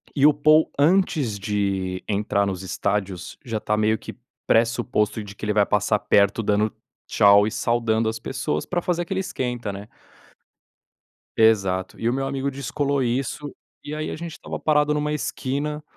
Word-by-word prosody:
E 140 Hz, -1 st, +4 dB
o 150 Hz, -, +7 dB
Paul 155 Hz, +2 st, +4 dB
antes 145 Hz, -, +2 dB
de 95 Hz, -2 st, -2 dB
entrar 100 Hz, 0 st, 0 dB
nos 95 Hz, -2 st, -3 dB
estádios, 95 Hz, -1 st, -3 dB
já 115 Hz, -2 st, -2 dB
está 105 Hz, 0 st, -1 dB
meio 110 Hz, +1 st, +2 dB
que -, -, -9 dB, 0.3 s
pressuposto 115 Hz, -2 st, +1 dB
de 100 Hz, 0 st, -10 dB
que 105 Hz, -, -7 dB
ele 105 Hz, -, 0 dB
vai 105 Hz, 0 st, +4 dB
passar 105 Hz, +1 st, +1 dB
perto, 100 Hz, +2 st, +2 dB
dando 105 Hz, +1 st, +1 dB, 0.4 s
"tchau" 100 Hz, 0 st, +5 dB
e 110 Hz, -, -3 dB
saudando 115 Hz, -1 st, +1 dB
as 115 Hz, +1 st, -5 dB
pessoas 135 Hz, +3 st, -3 dB
para 175 Hz, -1 st, -2 dB
fazer 175 Hz, 0 st, -1 dB
aquele 190 Hz, +2 st, -3 dB
esquenta, 125 Hz, -, -3 dB
né. 100 Hz, +2 st, -8 dB, 1.5 s
Exato. 95 Hz, -5 st, +2 dB
E 115 Hz, -, -1 dB
o 120 Hz, -, +2 dB
meu 135 Hz, 0 st, -1 dB
amigo 135 Hz, 0 st, -2 dB
descolou 140 Hz, +1 st, -1 dB
isso 135 Hz, +4 st, -2 dB, 0.3 s
e 145 Hz, -, -6 dB
aí 155 Hz, -, -3 dB
a -, -, -4 dB
gente 170 Hz, 0 st, -7 dB
estava -, -, -7 dB
parado 150 Hz, -1 st, +2 dB
em -, -, -1 dB
uma 150 Hz, 0 st, -1 dB
esquina 150 Hz, +1 st, -3 dB
115 Hz, 175 wpm, -23 LUFS, 105-145 Hz, 1.5 s, o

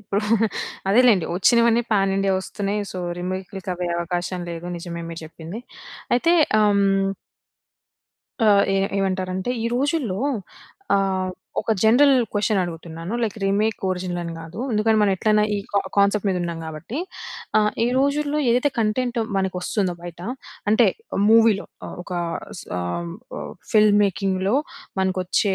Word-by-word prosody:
ఇప్పుడు 200 Hz, +1 st, -1 dB, 0.7 s
అదేలెండి 215 Hz, -4 st, +5 dB
వచ్చినవన్నీ 235 Hz, +3 st, +4 dB
pan 195 Hz, -2 st, +3 dB
India 195 Hz, 0 st, +2 dB
వస్తున్నాయి. 200 Hz, +2 st, -3 dB
సో, 185 Hz, -, -6 dB, 0.2 s
రీమేక్‌లకి 185 Hz, +1 st, -5 dB
అవే 180 Hz, 0 st, -3 dB
అవకాశం 175 Hz, +1 st, -2 dB
లేదు, 170 Hz, 0 st, -6 dB
నిజమే 170 Hz, 0 st, -6 dB
మీరు 165 Hz, -, -7 dB
చెప్పింది. 165 Hz, +6 st, -8 dB, 0.5 s
అయితే, 330 Hz, +8 st, +3 dB, 0.2 s
హ్మ్. 200 Hz, -2 st, +3 dB, 1.4 s
ఆహ్, 200 Hz, -1 st, +6 dB
ఏ -, -, +2 dB, 0.2 s
ఏమంటారంటే, 185 Hz, +1 st, -1 dB
ఈ -, -, +2 dB
రోజుల్లో 275 Hz, -, 0 dB, 0.8 s
ఆహ్, 190 Hz, -1 st, 0 dB, 0.3 s
ఒక -, -, -3 dB
జనరల్ 255 Hz, +6 st, +6 dB, 0.2 s
క్వెషన్ 205 Hz, 0 st, +1 dB
అడుగుతున్నాను, 165 Hz, +2 st, -6 dB
లైక్ 220 Hz, -2 st, -1 dB
రీమేక్, 205 Hz, +3 st, +1 dB
ఒరిజినల్ 180 Hz, -1 st, -2 dB
అని 170 Hz, -1 st, -5 dB
గాదు. 165 Hz, +3 st, -9 dB
ఎందుకని 220 Hz, +1 st, +3 dB
మనం 205 Hz, -2 st, +4 dB
ఎట్లైనా 215 Hz, +2 st, +3 dB
ఈ -, -, 0 dB, 0.2 s
కా 200 Hz, -, +3 dB, 0.2 s
కాన్సెప్ట్ 200 Hz, +1 st, +3 dB
మీదున్నాం 175 Hz, -3 st, -1 dB
గాబట్టి. 160 Hz, -, -6 dB, 0.6 s
ఆహ్, 210 Hz, 0 st, +3 dB
ఈ -, -, +2 dB
రోజుల్లో 290 Hz, +2 st, +1 dB
ఏదైతే 250 Hz, +5 st, +3 dB
కంటెంటొ 235 Hz, +2 st, 0 dB
మనకొస్తుందో 190 Hz, 0 st, -1 dB
బయట, 175 Hz, -1 st, -8 dB, 0.5 s
అంటే 220 Hz, +1 st, +5 dB, 0.4 s
మూవీలో 225 Hz, -3 st, +5 dB, 0.2 s
ఆహ్, -, -, -8 dB
ఒక 180 Hz, -, -9 dB, 0.5 s
సామ్ 90 Hz, -, -4 dB, 0.2 s
వొ -, -, -5 dB, 0.3 s
ఫిల్మ్ 210 Hz, -2 st, +5 dB
మేకింగ్‌లో 195 Hz, +1 st, 0 dB, 0.5 s
మనకొచ్చే 190 Hz, +1 st, +1 dB
195 Hz, 130 wpm, -23 LUFS, 180-220 Hz, 1.4 s, ఆహ్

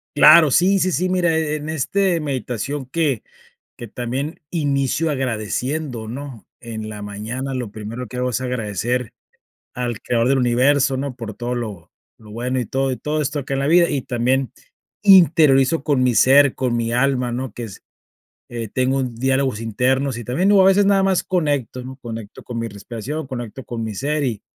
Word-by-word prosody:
Claro, 155 Hz, +1 st, +8 dB
sí, 190 Hz, +7 st, +4 dB
sí, 185 Hz, 0 st, +1 dB
sí, 180 Hz, +2 st, 0 dB
mira, 175 Hz, -3 st, +1 dB
eh, 155 Hz, -1 st, -1 dB
en 150 Hz, 0 st, -5 dB
este 175 Hz, +4 st, 0 dB
meditación 135 Hz, -1 st, -3 dB
que 140 Hz, -4 st, -1 dB, 0.5 s
que 120 Hz, -, -8 dB
también 130 Hz, +8 st, -4 dB
inicio 145 Hz, 0 st, 0 dB
agradeciendo, 125 Hz, -, -2 dB
¿no? 130 Hz, -1 st, -8 dB
En 110 Hz, -3 st, -7 dB
la 105 Hz, -1 st, -7 dB
mañana, 110 Hz, +7 st, -5 dB
lo 120 Hz, -5 st, -4 dB
primero 110 Hz, +4 st, -6 dB
que 125 Hz, +4 st, -8 dB
hago 125 Hz, 0 st, 0 dB
es 120 Hz, -, -2 dB
agradecer 120 Hz, 0 st, -2 dB, 0.6 s
al 120 Hz, -3 st, -3 dB
creador 120 Hz, 0 st, +1 dB
del 135 Hz, 0 st, +3 dB
universo, 130 Hz, +2 st, +3 dB
¿no?, 135 Hz, -2 st, -4 dB
por 115 Hz, -4 st, -7 dB
todo 120 Hz, +3 st, -3 dB
lo 105 Hz, -8 st, -6 dB, 0.3 s
lo 110 Hz, -3 st, -15 dB
bueno 125 Hz, +3 st, -2 dB
y 120 Hz, -, -2 dB
todo 135 Hz, +2 st, -1 dB
y 125 Hz, -, -3 dB
todo 155 Hz, +1 st, -2 dB
esto 145 Hz, +1 st, -2 dB
acá 140 Hz, 0 st, -5 dB
en 135 Hz, -, -1 dB
la 140 Hz, -, 0 dB
vida, 170 Hz, +1 st, +5 dB
y 140 Hz, -3 st, -1 dB
también 125 Hz, +1 st, 0 dB, 0.5 s
interiorizo 160 Hz, -6 st, +5 dB
con 140 Hz, -4 st, +2 dB
mi 125 Hz, -2 st, +2 dB
ser, 140 Hz, +1 st, +5 dB
con 125 Hz, -2 st, -1 dB
mi 115 Hz, -1 st, -1 dB
alma, 125 Hz, -1 st, +1 dB
¿no? 125 Hz, -2 st, -4 dB
Que 120 Hz, -, -6 dB
es 100 Hz, -, -11 dB, 0.9 s
tengo 130 Hz, +1 st, +1 dB
diálogos 130 Hz, 0 st, -1 dB
internos, 125 Hz, +3 st, 0 dB
y 120 Hz, -, -7 dB
también 175 Hz, -, +1 dB
o, 200 Hz, -, +6 dB
a -, -, +5 dB
veces, 195 Hz, +1 st, +5 dB
nada 195 Hz, -1 st, +4 dB
más 190 Hz, -2 st, +1 dB
conecto, 145 Hz, -8 st, -1 dB
¿no? 130 Hz, +1 st, -8 dB
Conecto 115 Hz, -5 st, -8 dB
con 120 Hz, -2 st, -5 dB
mi 115 Hz, 0 st, -2 dB
respiración, 120 Hz, +8 st, -6 dB
conecto 120 Hz, -1 st, -7 dB
con 115 Hz, -1 st, -5 dB
mi 110 Hz, -, -5 dB
ser, 145 Hz, +6 st, -1 dB
y 115 Hz, -6 st, -3 dB
130 Hz, 185 wpm, -20 LUFS, 120-145 Hz, 0.9 s, Claro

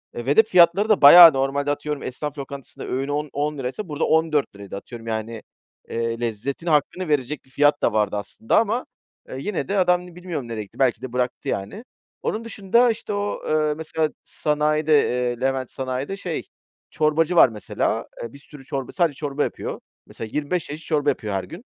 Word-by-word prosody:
eee, 120 Hz, -, -5 dB
ve 140 Hz, +2 st, +2 dB
de 220 Hz, -, +9 dB
fiyatları 185 Hz, +1 st, +4 dB
da 215 Hz, -, +3 dB
bayağı... 165 Hz, +3 st, +11 dB
Normalde 135 Hz, +2 st, 0 dB
atıyorum, 145 Hz, 0 st, -4 dB
esnaf 145 Hz, +3 st, -5 dB
lokantasında 140 Hz, -1 st, -8 dB
öğünü 135 Hz, +2 st, -2 dB
on 150 Hz, +1 st, -2 dB
on 150 Hz, +1 st, -2 dB
liraysa 135 Hz, +9 st, -5 dB
burada 150 Hz, +1 st, -1 dB
₺14'ydı. 150 Hz, -, 0 dB
Atıyorum, 115 Hz, +3 st, -9 dB
yani, 110 Hz, 0 st, -4 dB, 0.5 s
eee, 115 Hz, 0 st, -2 dB
lezzetin 120 Hz, +8 st, -4 dB
hakkını 165 Hz, +4 st, +1 dB
verecek 145 Hz, -1 st, -1 dB
bir -, -, -24 dB
fiyat 145 Hz, +2 st, +2 dB
da -, -, +2 dB
vardı 105 Hz, -1 st, +1 dB
aslında 215 Hz, -, -1 dB
ama, 235 Hz, +2 st, 0 dB, 0.4 s
eee, -, -, -6 dB
yine 165 Hz, -2 st, -3 dB
de 200 Hz, -, -1 dB
adam 180 Hz, -1 st, +2 dB
bilmiyorum 175 Hz, -8 st, -5 dB
nereye 115 Hz, -2 st, -4 dB
gitti, 115 Hz, +5 st, -18 dB
belki 125 Hz, -4 st, +2 dB
de 130 Hz, -2 st, -7 dB
bıraktı, 125 Hz, 0 st, -2 dB
yani. 100 Hz, -, -4 dB, 0.4 s
Onun 220 Hz, -, -2 dB
dışında, 230 Hz, +2 st, +2 dB
işte, 220 Hz, -1 st, -5 dB
o, 205 Hz, 0 st, -2 dB
eee, 155 Hz, -1 st, +2 dB
mesela, 160 Hz, 0 st, -1 dB
sanayide, 150 Hz, 0 st, +2 dB
eee, 125 Hz, -1 st, -2 dB
Levent 130 Hz, -1 st, -1 dB
Sanayi'de, 130 Hz, +8 st, -4 dB
şey, 175 Hz, -5 st, -4 dB, 0.5 s
çorbacı 155 Hz, +3 st, +1 dB
var, 165 Hz, -, +7 dB
mesela, 105 Hz, -3 st, -2 dB, 0.2 s
eee, 115 Hz, -, -7 dB
bir -, -, -11 dB
sürü 140 Hz, -1 st, -14 dB
çorba, 135 Hz, -1 st, -4 dB
sadece 170 Hz, -6 st, +1 dB
çorba 145 Hz, 0 st, -2 dB
yapıyor. -, -, -4 dB, 0.3 s
Mesela, 110 Hz, -, -8 dB
25 150 Hz, +3 st, -1 dB
çeşit 155 Hz, +2 st, -8 dB
çorba 150 Hz, -2 st, +1 dB
yapıyor 110 Hz, -7 st, -2 dB
her 95 Hz, -1 st, -1 dB
gün. 170 Hz, -, -10 dB
145 Hz, 185 wpm, -23 LUFS, 125-165 Hz, 0.5 s, bayağı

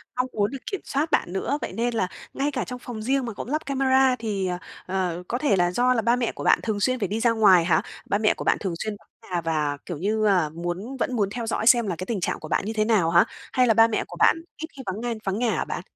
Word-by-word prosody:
mong 255 Hz, +1 st, 0 dB
muốn 205 Hz, +2 st, 0 dB
được 275 Hz, -, -4 dB
kiểm 390 Hz, -, -3 dB
soát 295 Hz, +3 st, -1 dB
bạn 175 Hz, -, +1 dB
nữa, 280 Hz, +9 st, -1 dB
vậy -, -, -4 dB
nên 240 Hz, +1 st, -1 dB
là 185 Hz, -5 st, 0 dB, 0.3 s
ngay 280 Hz, +2 st, -1 dB
cả 260 Hz, -3 st, -2 dB
trong 250 Hz, 0 st, -7 dB
phòng 240 Hz, -3 st, -7 dB
riêng 265 Hz, +3 st, 0 dB
mà 230 Hz, -, -5 dB
cũng 215 Hz, -, -7 dB
lắp 310 Hz, +3 st, -1 dB
camera 265 Hz, -1 st, +3 dB
thì, 200 Hz, -4 st, -2 dB
ờ, 180 Hz, -, -2 dB, 0.3 s
ờ, 180 Hz, -2 st, -2 dB
có 245 Hz, -, -1 dB
thể 265 Hz, -8 st, +2 dB
là 175 Hz, -1 st, +2 dB
do 250 Hz, +5 st, +3 dB
là 235 Hz, -, +1 dB
ba 235 Hz, +2 st, +3 dB
mẹ 245 Hz, -2 st, -1 dB
của -, -, -8 dB
bạn -, -, +4 dB
thường 215 Hz, -3 st, -1 dB
xuyên 255 Hz, +4 st, +1 dB
phải 200 Hz, -, 0 dB
đi 215 Hz, +4 st, -2 dB
ra 235 Hz, 0 st, +3 dB
ngoài 195 Hz, -7 st, +5 dB
hả? 170 Hz, -, +3 dB, 0.3 s
Ba -, -, +2 dB
mẹ 215 Hz, 0 st, +3 dB
của -, -, -7 dB
bạn -, -, +3 dB
thường 190 Hz, -4 st, -3 dB
xuyên 215 Hz, -1 st, -3 dB
vắng -, -, -21 dB
nhà 175 Hz, -1 st, 0 dB
và, 150 Hz, -3 st, -1 dB
kiểu 175 Hz, -, -5 dB
như, 215 Hz, +6 st, 0 dB
à, 180 Hz, -7 st, +3 dB
muốn 175 Hz, -, -5 dB
vẫn 255 Hz, 0 st, -1 dB
muốn 205 Hz, -3 st, +1 dB
theo 230 Hz, +2 st, -5 dB
dõi 220 Hz, 0 st, -1 dB
xem 235 Hz, -3 st, +6 dB
là 185 Hz, -, -1 dB
cái 185 Hz, -, -6 dB
tình 210 Hz, -1 st, -2 dB
trạng -, -, -1 dB
của 155 Hz, -, -8 dB
bạn 190 Hz, -, 0 dB
như 220 Hz, -, -3 dB
thế 215 Hz, -1 st, +1 dB
nào 210 Hz, -8 st, +3 dB
hả? 170 Hz, +1 st, +5 dB, 0.3 s
Hay 255 Hz, -1 st, +4 dB
là 225 Hz, -, +5 dB
ba 225 Hz, +1 st, +6 dB
mẹ 225 Hz, -, -1 dB
của -, -, -9 dB
bạn -, -, +6 dB, 0.2 s
ít 320 Hz, +2 st, -5 dB
khi 265 Hz, -, -6 dB
vắng 195 Hz, +4 st, -4 dB
nên 235 Hz, -2 st, -2 dB
vắng 195 Hz, +2 st, -1 dB
nhà 240 Hz, -2 st, +1 dB
hả -, -, -1 dB
bạn? -, -, -4 dB
220 Hz, 300 wpm, -24 LUFS, 185-250 Hz, 0.3 s, xem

